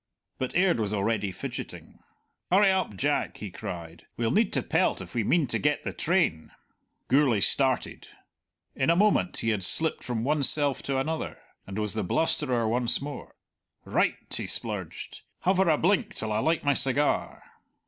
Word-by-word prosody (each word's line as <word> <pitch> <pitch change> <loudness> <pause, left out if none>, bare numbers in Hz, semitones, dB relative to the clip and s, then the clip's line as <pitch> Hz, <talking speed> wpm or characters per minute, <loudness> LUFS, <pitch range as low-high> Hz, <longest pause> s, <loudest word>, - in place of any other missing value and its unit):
But 130 - -3
Aird 180 -6 +3
was 105 -1 -2
already 105 -1 -1
fidgeting. - - -8 0.5
"Hurry 195 +2 +5
up, 185 - -1
Jack," 145 +5 -1
he 105 -3 -7
cried; 85 -2 -8
"we'll 115 -1 0
need 215 0 +2
to - - +2
pelt - - +1
if - - -9
we 115 - 0
mean 165 +8 +2
to 120 - -2
get 150 0 0
the - - -4
train." 165 - 0 0.6
Gourlay 135 -5 +3
started. 130 +5 +1 0.7
In - - 0
a 170 - +4
moment 200 -1 +2
he 115 - -1
had 105 -4 -1
slipped 160 - +2
from 115 -3 -3
one 150 +3 +1
self 140 0 +5
to 135 -1 -2
another, 155 +4 -3 0.3
and 95 +1 -7
was 105 -1 -1
the 110 -1 -2
blusterer 125 - +1
once 120 +1 0
more. 145 +1 -8 0.5
"Right!" - - +1 0.2
he - - -2
splurged. - - -4 0.2
"Hover 190 -1 +2
a 155 - +3
blink 205 +5 +1
till 110 0 -3
I 105 - 0
light 160 +7 0
my 145 -1 +3
cigar." 140 +2 +1
135 Hz, 170 wpm, -27 LUFS, 110-160 Hz, 0.7 s, Hurry